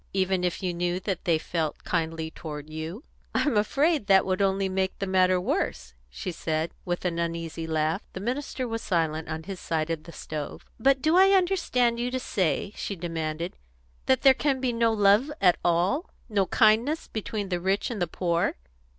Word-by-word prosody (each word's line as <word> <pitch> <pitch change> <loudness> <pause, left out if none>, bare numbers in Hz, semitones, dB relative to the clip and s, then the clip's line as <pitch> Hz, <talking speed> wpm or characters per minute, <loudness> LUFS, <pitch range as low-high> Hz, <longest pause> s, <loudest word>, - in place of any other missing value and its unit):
"Even 190 -1 +1
if 180 +2 -1
you 180 -1 0
knew 175 +1 -1
that 190 -2 -3
they 170 -3 +3
felt 160 -1 -3
kindly 160 -2 -2
toward 150 -2 -8
you?" 160 - -6 0.3
"I'm 290 - +2
afraid 280 +5 +2
that 195 -1 +5
would 185 0 0
only 195 0 +2
make 190 0 -1
the 195 - -2
matter 185 -1 +3
worse," - - -2 0.2
she 60 - -5
said, 160 0 -2
with 175 +1 -3
an 170 -1 0
uneasy 165 -1 -3
laugh. 160 +3 0
The - - -5
minister 255 +3 -3
was 225 -1 -3
silent 160 -3 -1
on 160 0 -4
his 190 +1 -6
side 160 0 -1
of 160 -2 -4
the 170 - -9
stove. 150 -2 -6
"But 265 +2 +3
do 315 +3 +4
I 385 +1 +7
understand 255 -11 +1
you 245 +1 0
to 255 +1 -2
say," 195 -2 -1
she 200 - -4
demanded, 165 0 -3 0.5
"that 260 -2 +3
there 270 -1 +8
can 270 0 0
be 255 -2 0
no 230 0 +3
love 210 +6 +4
at 180 -3 +5
all, 180 - +1 0.2
no 200 -4 +1
kindness, 235 +8 +3
between 210 -2 -4
the 180 -1 -1
rich 190 +6 0
and 215 -5 -4
the 175 - +1
poor? 170 0 0
185 Hz, 190 wpm, -27 LUFS, 165-230 Hz, 0.5 s, there